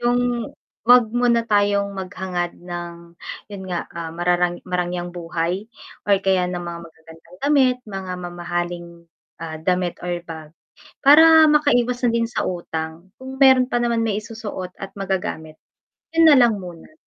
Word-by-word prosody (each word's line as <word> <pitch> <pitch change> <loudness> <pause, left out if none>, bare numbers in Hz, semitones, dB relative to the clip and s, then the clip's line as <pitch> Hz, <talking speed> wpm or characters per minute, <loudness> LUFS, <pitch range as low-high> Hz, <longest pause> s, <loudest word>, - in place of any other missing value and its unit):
'Yong 240 -1 0 0.3
'wag 245 -1 +6
muna 240 -1 +2
tayong 205 -2 +1
maghangad 185 -2 -4
ng 170 -1 -8 0.4
'yon 195 -1 -7
nga 175 -1 -3
ah, 165 -1 -6
mararang 175 0 0
marangyang 175 -1 -3
buhay 175 +3 -3 0.4
or 200 - +5
kaya 190 -2 +2
ng 180 -1 -4
mga 170 -1 -6
magagandang 165 +1 -16
damit, 270 -3 +3
mga 190 -2 -5
mamahaling, 175 0 -4 0.5
ah, 160 -1 -5
damit 180 0 0
or 175 -1 -2
bag, 160 -2 -9 0.6
para 320 +2 +8
makaiwas 250 -5 +2
na - - +3
din 230 0 0
sa 240 - -2
utang, 165 -1 -5
kung 265 0 -8
meron 260 -1 +6
pa 245 - -1
naman 235 -1 0
maisusuot 215 -3 -5
at 195 0 -7
magagamit 180 -5 -4 0.6
'yon 330 -1 +7
na - - +7
lang 240 -4 +4
muna. 175 - -11
185 Hz, 145 wpm, -21 LUFS, 175-235 Hz, 0.6 s, para